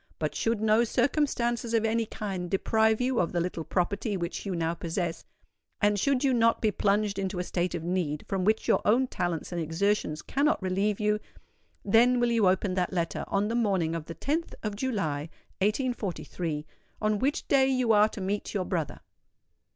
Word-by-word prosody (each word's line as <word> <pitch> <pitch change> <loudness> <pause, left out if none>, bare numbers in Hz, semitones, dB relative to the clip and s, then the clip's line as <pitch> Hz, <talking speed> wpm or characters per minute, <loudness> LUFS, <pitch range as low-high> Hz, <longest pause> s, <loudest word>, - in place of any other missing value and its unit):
But - - -2
should 225 -2 0
no 220 +1 +4
circumstances 240 -2 0
of 225 -1 +2
any 225 0 +1
kind 195 -6 -4
deprive 220 +3 +2
you 250 0 +1
of 170 - +1
the 175 - +1
little 170 -1 -2
property 200 +5 -1
which 170 +3 -4
you 190 - -2
now 165 0 0
possess—and 175 +4 -3
should 275 +3 +1
you 270 -2 +3
not 230 -1 +3
be 215 - +2
plunged 205 0 +1
into 190 -1 -2
a 180 - -1
state 175 0 -1
of 165 - -4
need 170 -4 -2
from 190 -1 -1
which 215 +3 +1
your - - +3
own 240 +5 +4
talents 175 -9 -3
and 175 -1 -2
exertions 165 -1 0
cannot 290 +3 +1
relieve 195 +2 0
you,—then 215 +2 0
will 240 0 +2
you 225 -4 +3
open 185 +1 +1
that 180 -1 0
letter 170 -3 -2
on 200 +1 0
the 225 - -2
morning 195 -8 +1
of 165 -2 -4
the 165 - -7
10th 320 +4 -2
of 210 -2 -2
July, 180 - -2 0.3
1843, 195 - -2 0.3
on 215 -1 +1
which 280 +5 -1
day 270 -2 +4
you 255 -3 +2
are 210 0 +5
to 205 - -8
meet 200 +3 -3
your 190 -2 0
brother. 160 -7 -3
205 Hz, 180 wpm, -28 LUFS, 180-230 Hz, 0.3 s, are